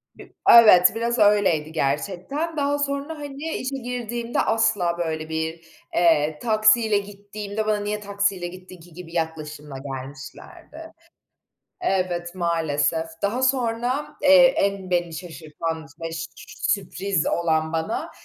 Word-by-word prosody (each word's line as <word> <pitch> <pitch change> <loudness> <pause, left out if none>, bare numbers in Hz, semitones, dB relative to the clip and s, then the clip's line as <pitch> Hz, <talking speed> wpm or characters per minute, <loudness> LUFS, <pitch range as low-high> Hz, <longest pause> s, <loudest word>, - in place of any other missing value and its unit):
Bi - - -15 0.2
evet, 210 -6 +8
biraz 235 +1 -1
öyleydi 195 -7 +3
gerçekten. 185 - -2
Daha 285 0 0
sonra, 285 +2 -2
hani, 285 0 -7
işe 260 +2 -4
girdiğimde 240 -1 -4
asla 215 -6 +1
böyle 160 -2 -3
bir, 160 +1 -3 0.3
eee, 155 -3 +3
taksiyle 215 -1 +4
gittiğimde 205 +1 -5
bana, 215 -1 +1
"Niye 210 +1 -3
taksiyle 200 -3 -1
gittin 185 0 -12
ki?" 170 +1 -16
gibi 170 0 -11
yaklaşımla 155 -3 -4
gelmişlerdi. 140 - -9 0.9
Evet, 180 - -1
maalesef. 165 -2 0 0.2
Daha 225 +6 0
sonra, 255 +1 0
eee, 280 -2 +8
en 195 -2 -1
beni 175 -2 0
şaşırtan 160 -1 -6
ve 165 0 -5
ş 165 0 -4 0.5
sürpriz 195 -3 -1
olan 160 -2 0
bana 160 0 -2
190 Hz, 120 wpm, -23 LUFS, 165-230 Hz, 0.9 s, evet